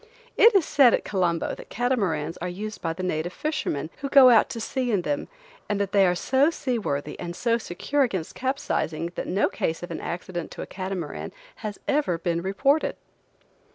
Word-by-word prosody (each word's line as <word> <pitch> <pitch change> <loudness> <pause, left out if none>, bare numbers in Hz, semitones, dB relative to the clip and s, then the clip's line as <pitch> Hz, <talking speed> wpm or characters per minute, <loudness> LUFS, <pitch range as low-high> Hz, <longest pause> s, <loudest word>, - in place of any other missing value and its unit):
It 455 -1 +7
is 370 -6 +5
said 270 -5 +5
at - - -5
Colombo 175 -4 0
that - - -10
catamarans 195 - 0
are 180 - -4
used 215 +4 -6
by 165 - -1
the 185 +3 -5
native 175 -1 -1
fisherman, 165 - -2
who 275 - -4
go 270 -3 +8
out 225 - +5
to 230 - -5
sea 250 +2 -2
in 195 -5 +1
them, 290 +8 -2 0.4
and 205 -1 0
that 200 -1 -1
they 195 -2 +5
are 180 - +2
so 265 - +3
seaworthy 220 - -3
and 175 -1 -5
so 230 +3 +1
secure 255 +9 -2
against 190 -11 -1
capsizing 175 - -2
that - - -4
no 195 +3 +2
case 160 +2 -2
of 175 - -6
an - - -4
accident 175 -1 -5
to - - -7
a - - -6
catamaran 185 -5 -5 0.3
has 210 -2 -6
ever 280 - +1
been 170 0 -1
reported. 270 - +1
195 Hz, 190 wpm, -25 LUFS, 175-255 Hz, 0.4 s, go